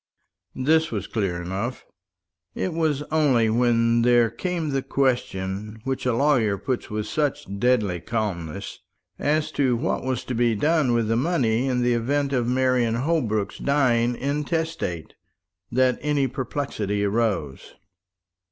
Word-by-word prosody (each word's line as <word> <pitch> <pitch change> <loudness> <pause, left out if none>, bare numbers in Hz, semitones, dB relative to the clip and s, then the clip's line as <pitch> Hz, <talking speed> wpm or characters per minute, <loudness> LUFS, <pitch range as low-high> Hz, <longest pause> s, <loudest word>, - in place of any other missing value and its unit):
This 160 +5 +2
was - - -3
clear 95 -6 -2
enough. 95 +8 -4 0.7
It 185 - -2
was 155 -3 0
only 130 -8 +3
when 115 0 +3
there 120 -1 +4
came 170 0 -2
the 135 -1 0
question, 105 -6 -1
which 135 0 -2
a 120 - +2
lawyer 120 -7 +2
puts 130 +4 -3
with 105 0 -3
such 145 +6 -1
deadly 105 -7 +2
calmness, 90 -7 -4 0.4
as 150 +1 0
to 130 -4 +1
what 135 +8 -1
was 130 -1 -2
to 125 - -4
be 120 -1 +2
done 150 +1 +2
with 115 -2 +1
the 115 - +1
money 130 -4 +1
in 125 -2 +1
the 120 0 +3
event 140 +4 0
of 120 -3 +1
Marian 125 -2 +2
Holbrook's 120 -7 -1
dying 125 -4 +2
intestate, 145 - -2 0.6
that 130 +1 +2
any 145 -2 +1
perplexity 120 -6 -3
arose. 100 - -1
125 Hz, 135 wpm, -24 LUFS, 110-140 Hz, 0.7 s, there